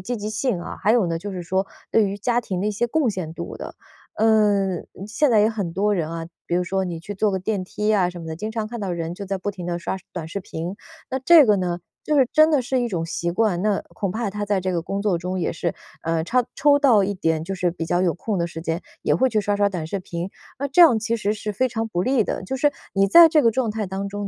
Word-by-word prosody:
积 240 Hz, +6 st, -3 dB
极 210 Hz, +1 st, -4 dB
性 215 Hz, -5 st, -1 dB
啊， -, -, -7 dB
还 215 Hz, -, +3 dB
有 230 Hz, -7 st, +3 dB
呢 165 Hz, 0 st, -1 dB
就 200 Hz, +3 st, -6 dB
是 180 Hz, -1 st, -5 dB
说 190 Hz, +3 st, -1 dB, 0.2 s
对 220 Hz, -, +4 dB
于 200 Hz, -, -4 dB
家 240 Hz, +4 st, 0 dB
庭 185 Hz, -6 st, -4 dB
的 205 Hz, -, -1 dB
一 -, -, 0 dB
些 225 Hz, +4 st, 0 dB
贡 265 Hz, -1 st, +1 dB
献 170 Hz, -5 st, -5 dB
度 170 Hz, -, -6 dB
的。 -, -, -8 dB, 0.4 s
嗯， 205 Hz, -4 st, +2 dB, 0.2 s
现 245 Hz, +6 st, +1 dB
在 215 Hz, -2 st, +5 dB
也 215 Hz, -, +4 dB
很 200 Hz, -7 st, -4 dB
多 205 Hz, +2 st, +2 dB
人 165 Hz, -3 st, -2 dB
啊， 165 Hz, 0 st, -5 dB, 0.2 s
比 175 Hz, -, -1 dB
如 180 Hz, -, +1 dB
说 190 Hz, +1 st, -1 dB
你 170 Hz, -2 st, -4 dB
去 200 Hz, +5 st, -7 dB
坐 205 Hz, +1 st, +1 dB
个 190 Hz, -, -1 dB
电 190 Hz, 0 st, -2 dB
梯 210 Hz, +3 st, -1 dB
啊 185 Hz, -4 st, +3 dB
什 175 Hz, -1 st, -8 dB
么 165 Hz, -, -8 dB
的， 160 Hz, -, -4 dB
经 215 Hz, +6 st, -5 dB
常 220 Hz, -1 st, -3 dB
看 235 Hz, 0 st, -6 dB
到 195 Hz, -2 st, -3 dB
人 170 Hz, -1 st, -3 dB
就 200 Hz, +2 st, -7 dB
在 195 Hz, 0 st, -2 dB
不 195 Hz, +2 st, -3 dB
停 180 Hz, -3 st, -8 dB
地 175 Hz, 0 st, -2 dB
刷 190 Hz, +2 st, -3 dB
短 170 Hz, -3 st, -5 dB
视 195 Hz, +5 st, -5 dB
频。 175 Hz, +1 st, -5 dB, 0.4 s
那 260 Hz, -, -1 dB
这 310 Hz, +2 st, +7 dB
个 210 Hz, -3 st, +4 dB
呢， 175 Hz, -2 st, -2 dB, 0.2 s
就 300 Hz, -, 0 dB
是 265 Hz, -, +5 dB
真 310 Hz, +1 st, +6 dB
的 290 Hz, -5 st, +3 dB
是 255 Hz, +1 st, 0 dB
一 240 Hz, -, 0 dB
种 170 Hz, -6 st, -2 dB
习 170 Hz, +1 st, -2 dB
惯， 185 Hz, -2 st, +1 dB
那 210 Hz, -1 st, +1 dB
恐 195 Hz, -3 st, -3 dB
怕 220 Hz, 0 st, -2 dB
他 205 Hz, +1 st, -4 dB
在 200 Hz, -1 st, +1 dB
这 185 Hz, 0 st, -2 dB
个 170 Hz, -, 0 dB
工 195 Hz, +4 st, -3 dB
作 190 Hz, -5 st, +1 dB
中 180 Hz, +2 st, -3 dB
也 175 Hz, -, -1 dB
是， 170 Hz, 0 st, -2 dB, 0.3 s
呃， 165 Hz, 0 st, 0 dB
插 250 Hz, +6 st, +2 dB
抽 285 Hz, 0 st, +4 dB
到 235 Hz, -9 st, +5 dB
一 200 Hz, -, -1 dB
点 165 Hz, -4 st, -1 dB
就 195 Hz, +2 st, -4 dB
是 180 Hz, -1 st, 0 dB
比 165 Hz, -1 st, -5 dB
较 175 Hz, +2 st, +1 dB
有 180 Hz, -3 st, +2 dB
空 200 Hz, +2 st, -3 dB
的 170 Hz, -, 0 dB
时 165 Hz, -1 st, -8 dB
间， 165 Hz, +1 st, -2 dB, 0.2 s
也 -, -, +2 dB
会 260 Hz, +1 st, +3 dB
去 215 Hz, -3 st, +1 dB
刷 205 Hz, 0 st, 0 dB
刷 205 Hz, 0 st, +3 dB
短 175 Hz, -5 st, -4 dB
视 195 Hz, +4 st, -3 dB
频。 175 Hz, 0 st, -5 dB, 0.3 s
那 280 Hz, -, -1 dB
这 315 Hz, +6 st, +3 dB
样 295 Hz, -10 st, +8 dB
其 230 Hz, +1 st, -1 dB
实 210 Hz, -1 st, -1 dB
是 210 Hz, 0 st, -4 dB
非 255 Hz, +6 st, +1 dB
常 225 Hz, -1 st, -2 dB
不 175 Hz, -5 st, -2 dB
利 255 Hz, 0 st, +2 dB
的， -, -, -3 dB
就 265 Hz, +8 st, -4 dB
是 290 Hz, +2 st, +2 dB, 0.2 s
你 195 Hz, 0 st, +4 dB
在 335 Hz, -, +9 dB
这 310 Hz, -2 st, +4 dB
个 230 Hz, -, +5 dB
状 230 Hz, -1 st, 0 dB
态 215 Hz, -2 st, -3 dB
当 195 Hz, +1 st, -4 dB
中 205 Hz, +1 st, -5 dB
200 Hz, 310 characters per minute, -23 LUFS, 175-225 Hz, 0.4 s, 在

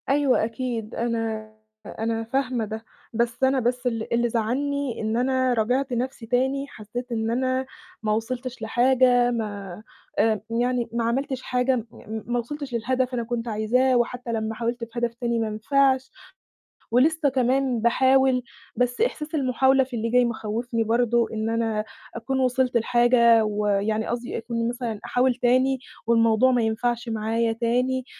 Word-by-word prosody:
أيوه، 275 Hz, -4 st, +3 dB
أكيد 230 Hz, -2 st, -4 dB
أنا 225 Hz, -2 st, -2 dB, 0.3 s
أنا 225 Hz, 0 st, -3 dB
فاهمة 250 Hz, -1 st, -1 dB
ده، 220 Hz, +1 st, -7 dB, 0.3 s
بس 235 Hz, +2 st, -1 dB
أنا 265 Hz, 0 st, +4 dB
بس 245 Hz, +1 st, -1 dB
ال 230 Hz, -2 st, -2 dB
اللي 240 Hz, 0 st, +2 dB
زعّلني 260 Hz, +4 st, -1 dB
إن 220 Hz, +1 st, -1 dB
أنا 260 Hz, 0 st, +2 dB
راجعت 250 Hz, +4 st, 0 dB
نَفسي 245 Hz, 0 st, -3 dB
تاني، 265 Hz, +4 st, 0 dB
حسيت 240 Hz, +2 st, -7 dB
إن 225 Hz, -1 st, -1 dB
أنا 255 Hz, +2 st, 0 dB, 0.4 s
ما 215 Hz, -, 0 dB
وصلتش 250 Hz, +3 st, -4 dB
لحاجة، 245 Hz, +1 st, +3 dB
ما 205 Hz, -4 st, -5 dB, 0.4 s
آآ 215 Hz, -3 st, +2 dB
يعني 240 Hz, +1 st, 0 dB
ما 235 Hz, 0 st, 0 dB
عملتش 260 Hz, +3 st, -1 dB
حاجة 250 Hz, +1 st, +1 dB
م 230 Hz, -3 st, -3 dB, 0.4 s
ما 240 Hz, 0 st, 0 dB
وصلتش 280 Hz, +2 st, -6 dB
للهدف 255 Hz, +2 st, 0 dB
أنا 240 Hz, -1 st, -1 dB
كنت 235 Hz, 0 st, -3 dB
عايزاه، 240 Hz, +4 st, +2 dB
وحتى 240 Hz, 0 st, -2 dB
لمّا 220 Hz, 0 st, -2 dB
حاولت 235 Hz, +1 st, -3 dB
في 230 Hz, +1 st, -5 dB
هدف 235 Hz, -1 st, -1 dB
تاني 235 Hz, -1 st, -1 dB
ما 225 Hz, -1 st, -1 dB
نفعش، 265 Hz, +4 st, +1 dB, 0.8 s
ولسه 295 Hz, +5 st, +3 dB
كمان 260 Hz, -1 st, +1 dB
باحاول، 260 Hz, +2 st, +3 dB, 0.3 s
بس 245 Hz, -, 0 dB
إحساس 315 Hz, -10 st, -1 dB
المحاولة 265 Hz, -1 st, +3 dB
في 255 Hz, -1 st, -7 dB
اللي 230 Hz, 0 st, -1 dB
جاي 250 Hz, +1 st, +4 dB
مخوفني 230 Hz, +1 st, -2 dB
برضو، 235 Hz, +1 st, +2 dB
إن 220 Hz, 0 st, -3 dB
أنا 225 Hz, -2 st, -1 dB, 0.3 s
أكون 265 Hz, +3 st, -2 dB
وصلت 255 Hz, -1 st, +2 dB
لحاجة 235 Hz, -1 st, +4 dB
ويعني 210 Hz, +1 st, 0 dB
قصدي 240 Hz, 0 st, -3 dB
أكون 230 Hz, 0 st, -2 dB
مثلًا 240 Hz, -3 st, -4 dB
أحاول 250 Hz, 0 st, +2 dB
تاني 255 Hz, +2 st, +2 dB, 0.3 s
والموضوع 230 Hz, +2 st, +4 dB
ما 245 Hz, -1 st, +2 dB
ينفعش 235 Hz, +2 st, -1 dB
معايا 225 Hz, +1 st, 0 dB
تاني، 250 Hz, +3 st, 0 dB
240 Hz, 150 wpm, -24 LUFS, 225-255 Hz, 0.8 s, أنا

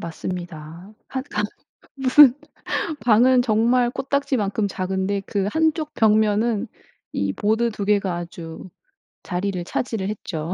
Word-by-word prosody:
맞습니다. 170 Hz, +1 st, -7 dB, 0.2 s
1 260 Hz, 0 st, -4 dB
칸 210 Hz, -, -1 dB, 0.5 s
무슨 265 Hz, -1 st, +7 dB, 0.7 s
방은 245 Hz, +3 st, +5 dB
정말 240 Hz, +1 st, +2 dB
코딱지만큼 255 Hz, -7 st, -1 dB
작은데 190 Hz, +1 st, -2 dB
그 200 Hz, -3 st, -1 dB
1 320 Hz, +3 st, +2 dB
쪽 305 Hz, -1 st, -6 dB
벽면은 220 Hz, 0 st, +2 dB, 0.4 s
이 100 Hz, -1 st, -1 dB
보드 220 Hz, -, +1 dB
2 205 Hz, -2 st, -5 dB
개가 200 Hz, -4 st, +1 dB
아주 170 Hz, 0 st, -8 dB, 0.6 s
자리를 185 Hz, 0 st, -2 dB
차지를 220 Hz, -2 st, -2 dB
했죠. 170 Hz, -5 st, -4 dB
210 Hz, 220 characters per minute, -22 LUFS, 185-245 Hz, 0.7 s, 무슨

